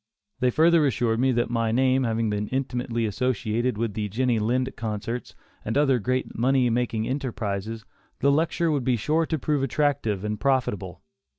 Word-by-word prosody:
They 125 - +3
further 160 +3 +4
assured 115 -2 0
me 130 +1 +3
that 120 0 0
my 115 -1 0
name 130 +2 +2
having 115 -1 0
been 105 0 -1
intimately 125 -3 -2
associated 120 +1 -1
with 115 -2 -1
the 105 0 -3
Jenny 120 +2 +1
Lind 125 +4 0
concerts 115 +2 -4 0.3
and 110 +5 -1
other 135 -4 +3
great 130 +4 -2
money 125 +1 +2
making 115 -2 -1
enterprises, 110 -5 -3 0.3
the 140 - +3
lecture 160 +2 +1
would 145 -4 0
be 125 0 +2
sure 155 +8 0
to 160 - -1
prove 145 0 0
attractive 135 -7 0
and 105 -1 -3
profitable. 105 -9 -1
120 Hz, 170 wpm, -25 LUFS, 110-135 Hz, 0.3 s, further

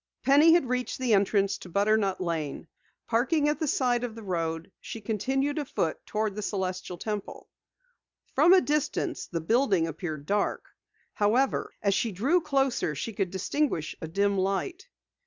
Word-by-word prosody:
Penny 295 +4 +6
had 340 -7 +2
reached 250 0 -2
the 255 -3 +1
entrance 200 0 +2
to 180 - -11
Butternut 200 +1 +1
Lane. 165 -3 -3 0.4
Parking 275 +6 +2
at 300 - -1
the 315 - -1
side 245 -3 +1
of 235 -3 -4
the 225 - -9
road, 165 -2 -3
she 225 - -7
continued 265 +8 -1
afoot 215 - -2
toward 215 -1 -1
the 210 - -5
Celestial 185 -3 -3
Temple. 210 +1 -5 0.9
From 310 +6 +5
a 375 - +7
distance 300 -2 -1
the 165 -2 -3
building 205 - +2
appeared 155 -2 -5
dark. 205 +5 0 0.5
However, 235 +6 +1
as 200 -1 +3
she 205 +4 0
drew 270 - +2
closer 270 - 0
she 225 - -4
could 195 -2 -1
distinguish 190 - -1
a 160 - -4
dim 200 +4 +1
light. 270 - -2
210 Hz, 155 wpm, -28 LUFS, 185-270 Hz, 0.9 s, a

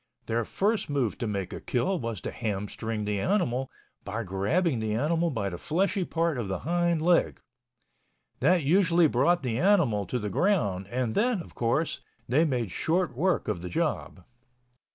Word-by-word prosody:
Their 115 0 -1
first 210 - 0
move 135 -7 -1
to 120 - -2
make 100 -3 -3
a - - -6
kill 135 +10 0
was 115 -5 -4
to - - -4
ham 105 -3 -3
string 110 -1 -4
the 105 -1 -1
animal 135 - 0 0.3
by 110 +4 -4
grabbing 115 - 0
the 110 -1 -1
animal 165 +7 +1
by 110 -9 -2
the 90 -2 -7
fleshy 190 - 0
part 165 -5 0
of 110 - -3
the 95 -1 -3
hind 170 -1 +1
leg. 175 0 +3 1.0
That 180 -3 +3
usually 170 +2 +4
brought 160 +5 +2
the 120 -2 -1
animal 145 - +3
to 125 - -1
the 105 -4 -3
ground 100 - +1
and 120 -1 -1
then, 235 -1 +2
of 170 - -10
course, 120 +7 0 0.3
they 145 +7 +3
made 120 - -1
short 170 - 0
work 180 +7 +1
of 105 -6 -2
the 90 - -5
job. 95 - -2
130 Hz, 175 wpm, -27 LUFS, 105-170 Hz, 1.0 s, usually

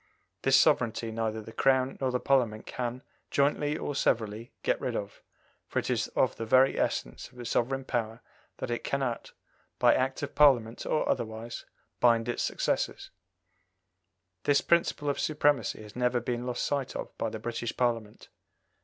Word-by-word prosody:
This - - +5
sovereignty 115 -1 +2
neither 110 -1 -2
the 115 - -10
Crown 130 +1 +2
nor 130 - +1
the 125 0 0
Parliament 120 -6 +1
can, 125 +1 -4 0.3
jointly 145 +1 +1
or 145 - -3
severally, 115 -4 0
get - - +1
rid - - -2
of, 100 0 -5 0.5
for - - -5
it - - 0
is - - 0
of - - +2
the 115 - -3
very 130 +3 +4
essence - - -2
of - - -20
a 120 - -7
sovereign 130 +3 0
power 115 -2 -3 0.3
that - - -4
it 120 - -2
cannot, 135 -4 -2 0.4
by - - +5
Act 130 +2 0
of 145 - -4
Parliament 120 -6 +4
or 155 - +1
otherwise, 115 +1 -3 0.3
bind 115 -1 +4
its 120 - -1
successors. - - -1 1.3
This 145 -1 +4
principle 170 -3 +1
of 140 - 0
supremacy 145 -8 +1
has 105 0 -13
never 125 0 +1
been 120 +1 -3
lost 125 -1 -1
sight 140 -3 -2
of - - -6
by 115 - 0
the 110 - -5
British 115 +1 -4
Parliament. 115 -4 -1
120 Hz, 165 wpm, -29 LUFS, 115-135 Hz, 1.3 s, This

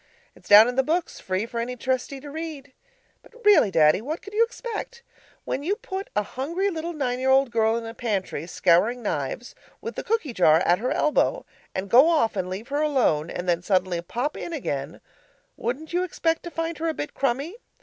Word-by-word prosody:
It's - - -18
down 210 +2 +9
in 250 +1 -3
the - - +6
books 325 +5 -2
free 190 +3 -2
for 235 0 -5
any 245 +2 -3
Trustee 260 +2 -2
to 290 0 -9
read. 300 -4 -7 0.5
But 470 - -20
really, 410 - +6
Daddy, 155 0 +4
what 305 +8 -5
could 405 - -11
you 445 +2 +4
expect? 475 0 -6 0.4
When 270 - -2
you 365 +8 0
put 400 -4 -6
a 210 - +2
hungry 335 - -2
little 335 0 -4
nine 255 -5 -2
year 265 +1 +4
girl 225 -2 +1
in 235 - -3
the 225 0 -7
pantry 200 - -3
scouring 210 +9 +2
knives, 150 - -3 0.3
with 460 - -6
the - - -5
cookie 415 - -1
jar 160 -6 +5
at 175 0 +3
her 250 +3 -1
elbow, 310 +11 +1 0.3
and 190 +1 -3
go 260 - +6
off 300 -10 +2
and 185 -2 -2
leave 200 +7 -6
her 290 +2 0
alone; 245 - +1
and 180 - -5
then 175 -1 +1
suddenly 185 -2 0
pop 245 - -3
in 340 - -6
again, 145 - -4 0.5
wouldn't 280 +8 -4
you 355 - +2
expect 330 -2 -1
to - - -4
find 330 -1 -4
her 330 - -1
a 315 - -3
bit 295 - -5
crumby? 275 - -1
260 Hz, 205 wpm, -25 LUFS, 205-325 Hz, 0.5 s, down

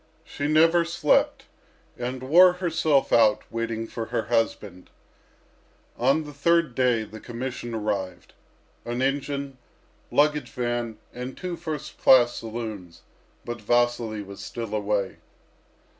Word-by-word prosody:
She 145 - -4
never 165 +3 +4
slept, 170 -3 +1 0.5
and 125 +1 -5
wore 175 +7 +7
herself 165 -5 +1
out 110 -2 +4
waiting 115 -1 -3
for 115 0 -5
her 110 - -2
husband. 105 -5 -2 1.1
On 135 +6 +2
the 150 -1 -10
third 170 0 +2
day 125 -3 +2
the 110 +1 -10
commission 120 0 -5
arrived. 100 -5 -3 0.5
An 120 +2 -2
engine, 140 -1 -2 0.5
luggage 150 0 +2
van, 120 -3 -3 0.2
and 125 +1 -7
two 180 -2 -4
first 155 -4 -6
class 120 -2 +6
saloons; 110 -6 -7 0.4
but 120 -1 -5
Vasily 120 -1 +1
was 100 0 -11
still 115 -3 -6
away. 105 -2 -1
120 Hz, 120 wpm, -25 LUFS, 110-145 Hz, 1.1 s, wore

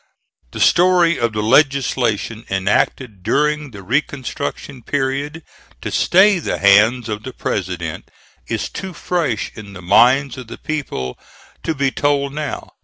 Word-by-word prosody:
The - - -8
story 175 -1 +4
of 115 -2 0
the 105 0 -1
legislation 120 -4 +1
enacted 100 +3 0
during 150 +7 0
the 100 -5 -11
reconstruction 140 +2 -3
period 145 +5 -2 0.4
to - - -4
stay 190 +1 +4
the - - -2
hands 105 +5 +4
of 105 -1 -4
the 130 +3 -8
President 90 -4 -4 0.4
is - - -2
too 190 -1 -7
fresh 160 -11 -2
in 100 -2 -10
the 95 - -10
minds 125 +8 +4
of 125 - -9
the - - -9
people 140 - -4 0.4
to 160 - -2
be 135 -1 +1
told 140 -1 0
now. 150 0 -5
130 Hz, 140 wpm, -19 LUFS, 105-150 Hz, 0.4 s, story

